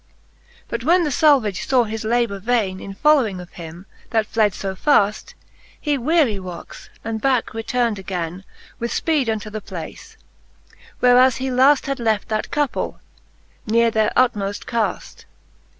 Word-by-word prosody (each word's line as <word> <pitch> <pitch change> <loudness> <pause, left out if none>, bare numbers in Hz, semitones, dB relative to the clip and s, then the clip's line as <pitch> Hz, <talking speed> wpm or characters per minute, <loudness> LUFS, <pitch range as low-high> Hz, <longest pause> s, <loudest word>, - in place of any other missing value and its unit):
But 235 0 -4
when 345 +5 +4
the 300 - -1
Salvage 255 -9 +3
faw 255 -2 +3
his 220 0 -5
labour 230 -3 0
vaine, 205 -3 0
In 195 0 -8
following 255 -9 +3
of 180 0 -11
him, 170 +2 -10 0.2
that 220 -2 +1
fled 210 -2 +1
fo 195 -1 -4
faft, 210 -1 +1 0.4
He 295 -2 0
wearie 275 -5 +2
woxe, 180 -2 -9
and 225 -1 -4
backe 260 -3 +1
return'd 225 -1 -1
againe 180 -1 -5 0.4
With 235 - -2
fpeede 300 -7 0
unto 215 -1 -3
the 215 0 -5
place, - - -9 0.8
whereas 250 0 +5
he 265 0 -3
laft 265 +3 +4
Had 275 -1 -3
left 220 -3 0
that 215 -1 -2
couple, 295 -2 -2 0.7
nere 230 +1 +3
their 220 -1 +1
utmoft 205 -6 +1
caft. 230 -3 -3
225 Hz, 150 wpm, -21 LUFS, 205-255 Hz, 0.8 s, whereas